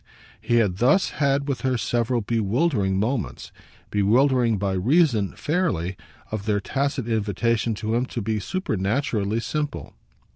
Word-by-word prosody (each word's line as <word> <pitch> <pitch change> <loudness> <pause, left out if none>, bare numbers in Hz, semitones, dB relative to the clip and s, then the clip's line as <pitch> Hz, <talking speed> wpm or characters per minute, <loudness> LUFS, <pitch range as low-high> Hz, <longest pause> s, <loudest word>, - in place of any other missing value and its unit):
He 120 - 0
had 105 -6 +2
thus 130 - +3
had 140 0 +2
with 135 -5 -2
her 130 0 +1
several 120 +1 0
bewildering 110 - +1
moments 115 0 -2 0.4
bewildering 120 +3 +3
by 100 0 -1
reason, 115 - +2
fairly, 100 - -1 0.4
of 110 -1 -4
their 105 -1 +2
tacit 135 +3 -2
invitation 110 +1 0
to 110 +1 -3
him 120 +2 +1
to 120 - -5
be 110 0 -1
supernaturally 110 - -1
simple. 150 +3 -4
115 Hz, 135 wpm, -24 LUFS, 105-135 Hz, 0.4 s, thus